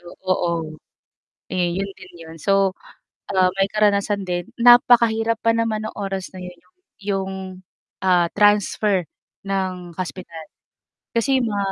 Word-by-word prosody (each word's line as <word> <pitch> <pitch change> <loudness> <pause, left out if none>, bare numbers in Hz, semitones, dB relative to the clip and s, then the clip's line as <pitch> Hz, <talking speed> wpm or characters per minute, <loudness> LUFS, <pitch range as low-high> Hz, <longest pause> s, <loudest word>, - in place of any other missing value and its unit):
Yo 175 - -14 0.2
oo. 170 -4 -1 0.7
Eh, 175 -1 0
'yon 195 +1 -2
din - - -14
'yon. 160 0 -11
So, 195 0 +2 0.6
ah, 185 -1 +4
may 195 0 +2
karanasan 205 -1 +1
din 175 0 -2 0.2
napakahirap 235 -2 +5
pa 230 - +2
naman 225 -2 -1
nung - - -8
oras 195 -2 -4
na 185 - -8
'yon 180 0 -9
yong 180 - -35 0.3
'yong, 195 -1 -2 0.7
ah, 180 -2 +4
transfer 205 -2 +3 0.4
ng 185 -3 -3
hospital. 180 -3 -6 0.7
Kasi 260 +3 +2
ma 220 -4 -1
195 Hz, 135 wpm, -21 LUFS, 180-215 Hz, 0.7 s, napakahirap